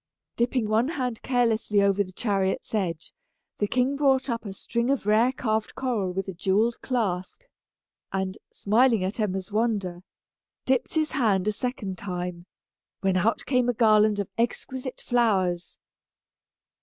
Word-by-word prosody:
Dipping 240 -1 +1
one 220 +4 +2
hand 255 -7 -3
carelessly 230 -4 +1
over 200 0 +3
the 185 - -12
chariot's 195 -1 -1
edge, 170 -6 -2 0.5
the 205 - +1
king 255 +5 +1
brought 270 -2 +2
up 230 -1 -3
a 200 - -4
string 235 +5 -2
of 275 -6 0
rare 220 +4 +4
carved 220 -4 -2
coral 230 -8 -1
with 195 +2 -3
a 190 - -4
jewelled 200 +6 +1
clasp, 200 - -2 0.7
and, 190 0 -2
smiling 225 0 +3
at 190 +5 -3
Emma's 190 -2 -2
wonder, 205 -5 -1 0.6
dipped 260 +3 0
his 310 -1 +1
hand 210 -8 +1
a - - +3
second 205 -5 -4
time, 180 -2 -5 0.5
when 190 -1 +1
out 220 +5 +1
came 250 -2 +2
a - - +2
garland 215 -2 +4
of 200 -2 -2
exquisite 255 +2 -2
flowers. 190 -8 +1
215 Hz, 145 wpm, -26 LUFS, 190-245 Hz, 0.7 s, rare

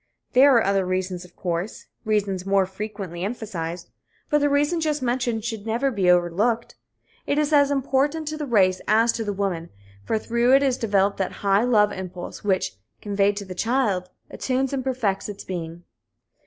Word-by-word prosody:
There 265 +1 +7
are 230 - +5
other 195 0 +2
reasons, 185 0 -2
of 180 - -19
course 175 +3 -4 0.2
reasons 205 -4 0
more 195 0 +2
frequently 190 -3 -6
emphasized 185 -6 -5 0.4
but 295 - +4
the 290 0 +2
reason 295 +4 +1
just 300 -3 -1
mentioned 240 -3 -1
should 225 -2 -4
never 240 +5 +1
be 195 -6 +1
overlooked. 180 +7 +2 0.5
It 285 - +1
is 300 0 +1
as 285 -1 +5
important 285 +3 0
to 310 - -4
the 300 -2 -4
race 190 -6 +3
as 225 +2 +4
to 225 - -3
the 205 - -2
woman, 190 -4 -2 0.3
for 220 - 0
through 235 +3 +3
it 275 - +4
is 260 -2 +1
developed 200 -2 +1
that 190 - -1
high 200 +2 +4
love 210 -4 +4
impulse 185 0 -7
which, 185 - 0 0.2
conveyed 200 0 +1
to 200 - -4
the 185 - -7
child, 205 -3 0 0.2
attunes 265 +1 -1
and 265 -2 -1
perfects 235 -7 -1
its 205 - -7
being. 170 -2 -6
210 Hz, 180 wpm, -24 LUFS, 190-255 Hz, 0.5 s, There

